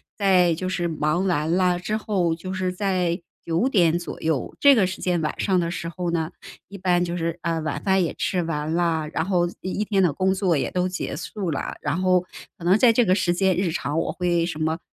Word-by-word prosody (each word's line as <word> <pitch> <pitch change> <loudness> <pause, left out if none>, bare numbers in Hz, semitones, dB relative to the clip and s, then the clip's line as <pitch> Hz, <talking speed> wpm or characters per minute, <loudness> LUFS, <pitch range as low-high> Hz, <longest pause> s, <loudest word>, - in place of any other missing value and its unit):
在 185 -4 +4
就 185 +3 -3
是 175 -2 -1
忙 155 +3 0
完 160 -4 0
啦 180 0 +2
之 215 +4 -2
后， 185 -6 0
就 185 +3 -6
是 185 -1 -1
在， 180 -2 0 0.3
9 170 +10 +1
点 175 -8 +3
左 175 - -7
右， 160 -5 -1
这 285 -1 +7
个 210 -8 +3
时 185 - -6
间 175 -2 +1
晚 155 - -3
上 190 -3 +2
的 170 -1 -1
时 170 -1 -4
候 175 +1 -3
呢， 165 -2 -1 0.4
一 200 0 -10
般 180 -1 +2
就 170 0 -3
是， 170 -1 -2
呃， 165 -1 0
晚 155 -2 -3
饭 190 -1 +3
也 165 - -1
吃 180 - -1
完 155 -2 -2
啦， 165 -2 0
然 - - 0
后 180 -1 +1 0.2
一 185 - -4
一 210 - -1
天 200 -2 +1
的 175 -4 +3
工 185 +6 +1
作 185 -4 +1
也 - - -2
都 180 0 0
结 180 -6 -4
束 185 +3 -4
啦， 140 - -3
然 - - -2
后 185 -1 +3 0.4
可 170 - -12
能 180 +2 +5
在 230 +2 +6
这 235 +1 +3
个 185 - +3
时 180 -2 +1
间 190 0 +2
日 185 -1 0
常 155 -1 -2
我 - - -1
会 175 -2 0
什 160 -3 -5
么， 160 +1 -1
175 Hz, 255 characters per minute, -23 LUFS, 165-190 Hz, 0.4 s, 这